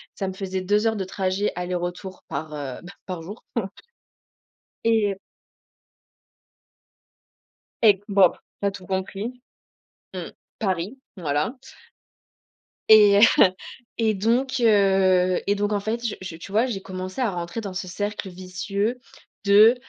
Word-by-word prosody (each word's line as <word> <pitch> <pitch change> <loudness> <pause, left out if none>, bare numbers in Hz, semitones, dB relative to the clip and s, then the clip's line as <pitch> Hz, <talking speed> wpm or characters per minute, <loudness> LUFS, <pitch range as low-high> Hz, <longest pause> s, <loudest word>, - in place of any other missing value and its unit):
ça 195 - -3
me 190 - -4
faisait 190 -1 -3
2 210 +4 +2
heures 220 - +1
de 195 - -2
trajet 190 +2 -1
aller-retour 180 +1 -4
par, 150 +2 -5
heu, 140 -3 -5
bah, 175 +2 -11
par 180 -3 -5
jour 200 +7 -10
en 210 -5 0
f 195 - -19 1.1
Et 225 -1 +4
heu 195 - -13 2.7
E 205 -4 +6
bop, 195 -3 +4 0.2
tu - - -1
as - - +1
tout 185 -2 -10
compris. 195 +5 -3 0.8
Mmh. - - -6 0.3
Paris, 195 +4 -2 0.2
voilà. 155 - -1 1.4
Et 205 -2 +8 0.2
heu, - - +10 0.5
et 225 -2 +2
donc 245 +6 +1
heu, 190 -4 +4
et 205 - +3
donc 205 +1 0
en 205 - +1
fait, 230 +3 -3
je 220 - -1
je 185 -3 -6
tu 170 +4 -10
vois, 225 +4 +3
j'ai 195 -6 -4
commencé 185 +3 -6
à 225 -5 +1
rentrer 175 +5 -4
dans 200 -3 -6
ce 185 0 -4
cercle 205 +2 -4
vicieux 190 +6 -3 0.4
de, 210 +4 +7
195 Hz, 145 wpm, -24 LUFS, 185-210 Hz, 2.7 s, heu